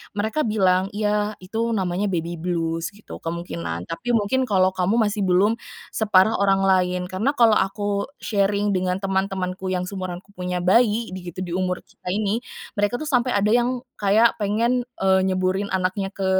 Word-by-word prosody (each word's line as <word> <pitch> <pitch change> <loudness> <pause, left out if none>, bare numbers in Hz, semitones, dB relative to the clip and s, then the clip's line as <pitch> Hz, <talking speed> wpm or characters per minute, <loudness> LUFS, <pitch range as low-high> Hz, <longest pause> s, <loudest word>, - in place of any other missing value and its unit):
mereka 220 +7 -1
bilang 190 -3 +2
"Iya, 210 0 0
itu 225 +4 -1
namanya 190 0 0
baby 170 -2 -3
blues," 165 0 -2
gitu, 210 - -10
"kemungkinan, 85 - -4
tapi, 240 +8 -1
mungkin 240 +5 +1
kalau 190 -3 +3
kamu 185 +3 0
masih 210 -3 +1
belum 200 +6 +3 0.3
separah 210 0 +3
orang 195 -1 +3
lain." 180 -1 +1
Karena 225 +10 0
kalau 230 -4 +5
aku 200 +1 -1 0.2
sharing 205 0 +1
dengan 185 0 -1
teman-temanku, 190 -1 -2
yang 185 -1 -1
seumuranku 185 0 -6
punya 180 -2 -3
bayi 225 +3 +3
di 185 -1 -7
gitu 180 +2 -5
di 175 - -6
umur 180 0 -1
kita - - -18
ini, 210 +1 0 0.4
mereka 205 +3 +1
tuh 275 - -4
sampai 250 -2 +2
ada 205 +1 +2
yang 245 +1 +1 0.2
kayak, 215 +3 +3
pengen, 235 +4 +1 0.2
eee, 190 0 +4
nyeburin 185 +1 0
anaknya 190 +1 -1
ke, 190 -1 +1
195 Hz, 165 wpm, -23 LUFS, 185-215 Hz, 0.4 s, kalau